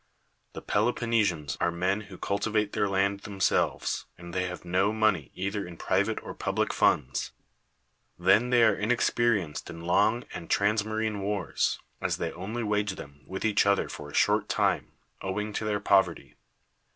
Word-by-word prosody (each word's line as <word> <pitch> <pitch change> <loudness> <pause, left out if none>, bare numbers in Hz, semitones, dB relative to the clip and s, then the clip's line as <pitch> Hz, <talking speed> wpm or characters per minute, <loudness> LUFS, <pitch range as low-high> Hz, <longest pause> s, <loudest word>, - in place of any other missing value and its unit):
The - - -8
Peloponnesians 105 - +1
are - - +3
men 90 +4 0
who 95 - -10
cultivate 105 +1 -1
their 100 - +1
land 100 +1 +1
themselves; 100 -1 0
and 85 0 -10
they 90 0 0
have 90 0 -7
no 95 +4 +2
money 110 - +1
either 100 +2 -2
in 85 -2 -9
private 100 +6 0
or - - -7
public - - -1
funds. 65 -3 +1 0.8
Then 95 +7 +4
they 120 -2 +5
are 110 -2 +6
inexperienced 110 -6 0
in 85 - -8
long 105 +7 +3
and 85 - -7
transmarine 110 +1 +1
wars, 100 -2 -1 0.2
as - - 0
they - - -2
only 110 +6 -4
wage 105 -2 0
them 70 -3 -11
with 95 +3 -4
each 105 -2 +3
other 100 -1 +3
for 75 -1 -8
a - - -9
short - - +3
time, - - 0 0.3
owing 105 +2 -3
to 110 - -2
their 105 -1 0
poverty. 100 -1 +2
100 Hz, 160 wpm, -28 LUFS, 90-110 Hz, 0.8 s, are